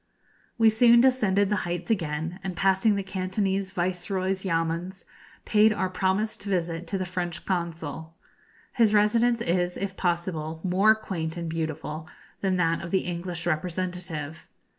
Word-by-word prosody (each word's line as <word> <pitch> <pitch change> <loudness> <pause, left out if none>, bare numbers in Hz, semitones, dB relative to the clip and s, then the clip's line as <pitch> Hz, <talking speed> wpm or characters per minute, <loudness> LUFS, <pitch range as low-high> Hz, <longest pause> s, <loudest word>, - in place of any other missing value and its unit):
We 225 -1 +6
soon 235 +2 +6
descended 210 -6 +3
the 210 - +1
heights 175 +2 -3
again, 165 -2 -2
and, 190 -2 -4
passing 195 +4 +3
the 200 - -2
Cantonese 190 +1 -1
Viceroy's 185 +1 -1
yamuns 170 +1 -2 0.4
paid 215 0 +5
our 190 -3 -1
promised 190 +4 0
visit 175 -4 -2
to 195 - -2
the 185 - -2
French 175 -2 -4
Consul. 165 -3 -3 0.6
His 220 -3 +3
residence 230 +3 +3
is, 175 -2 0
if 195 -1 -4
possible, 170 -3 -2
more 195 +4 +4
quaint 175 -7 -4
and 170 -1 -4
beautiful 155 -1 -4 0.3
than 190 -2 0
that 165 -2 +1
of 170 - -6
the 190 +1 +2
English 175 -1 -4
representative. 175 -2 -3
185 Hz, 140 wpm, -26 LUFS, 170-200 Hz, 0.6 s, We